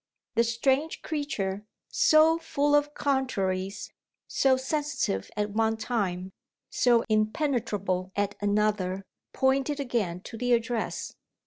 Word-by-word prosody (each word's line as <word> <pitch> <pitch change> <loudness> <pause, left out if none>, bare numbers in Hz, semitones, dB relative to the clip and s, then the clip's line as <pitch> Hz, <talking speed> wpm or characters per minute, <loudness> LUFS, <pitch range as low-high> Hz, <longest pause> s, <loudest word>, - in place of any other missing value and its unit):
The 230 0 +3
strange 265 +7 0
creature, 210 -11 -3 0.3
so 315 +1 +5
full 290 -2 0
of 290 0 +2
contraries 200 -8 -1 0.3
so 265 -1 +3
sensitive 285 - -2
at 210 0 -1
one 220 +1 +1
time, 195 -5 -2 0.4
so 240 -2 +3
impenetrable 215 -5 0
at 205 0 0
another 205 -2 0 0.3
pointed 270 +2 +1
again 230 -10 -1
to 225 - -9
the 245 0 +2
address. 230 -1 -1
230 Hz, 110 wpm, -27 LUFS, 205-275 Hz, 0.4 s, so